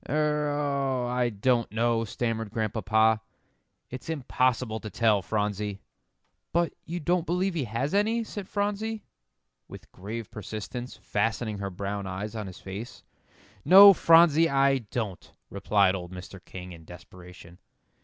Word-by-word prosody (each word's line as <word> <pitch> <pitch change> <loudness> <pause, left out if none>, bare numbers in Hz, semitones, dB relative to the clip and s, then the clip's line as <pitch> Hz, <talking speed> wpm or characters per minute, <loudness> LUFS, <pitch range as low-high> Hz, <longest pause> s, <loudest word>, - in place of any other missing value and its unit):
"Er 150 +1 +1
oh 140 -3 -1
I 125 0 0
don't 120 +2 0
know," 115 +1 +1
stammered 115 0 -3
Grandpapa; 110 0 +1 0.7
"it's 130 +5 -8
impossible 125 -6 0
to 110 - -7
tell, 105 0 +2
Phronsie." 105 -1 -2 0.7
"But 170 0 +1
you 170 +2 -4
don't 175 +2 0
believe 180 +2 0
he 155 -6 -2
has 120 - -3
any," 220 +3 +2
said 205 -3 -7
Phronsie, 210 +2 -2 0.6
with - - -13
grave 110 +4 -7
persistence, 110 +4 -7
fastening 110 0 -2
her 100 -1 -3
brown 100 +1 -4
eyes 95 +4 -5
on 105 -2 -4
his 95 - -10
face. 105 +6 -8 0.6
"No, 200 +2 +10
Phronsie, 165 -2 +5
I 135 0 +3
don't," 105 -5 -5 0.2
replied 100 -1 +2
old 90 -2 -6
Mr. 90 0 -10
King, 90 0 -9
in 85 -2 -12
desperation. 90 +1 -14
115 Hz, 135 wpm, -27 LUFS, 100-150 Hz, 0.7 s, No